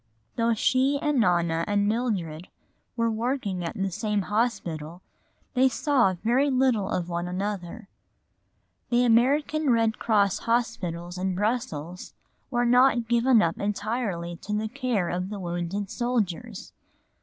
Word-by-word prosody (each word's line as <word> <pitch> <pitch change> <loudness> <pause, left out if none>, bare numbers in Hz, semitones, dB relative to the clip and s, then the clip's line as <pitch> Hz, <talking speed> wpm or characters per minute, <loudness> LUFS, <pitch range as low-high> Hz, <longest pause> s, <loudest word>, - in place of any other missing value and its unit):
For - - -3
although 230 0 +3
she 260 +5 +2
and 295 -3 +1
Nona 170 -5 +2
and 205 0 +1
Mildred 195 -8 -2 0.5
were 230 -1 +1
working 220 -5 -2
at 170 - -4
the 195 0 -2
same 210 +2 -1
hospital, 180 -7 -2 0.5
they 260 0 +4
saw 245 -7 +2
very 255 +5 +3
little 255 -6 +2
of 175 -1 -2
one 175 0 -3
another. 195 +2 -4 1.0
The 245 0 +3
American 280 +6 +2
Red 225 -2 +2
Cross 205 -4 +2
hospitals 180 -7 -1
in 185 0 -1
Brussels 180 -6 -3 0.3
were 245 -2 +1
not 245 -1 +4
given 235 -1 +4
up 165 - -1
entirely 200 -4 -2
to 210 - -6
the 215 +1 -2
care 245 -7 -1
of 180 +2 -3
the 205 -1 -5
wounded 175 +3 -3
soldiers. 235 -3 -3
215 Hz, 135 wpm, -26 LUFS, 180-245 Hz, 1.0 s, they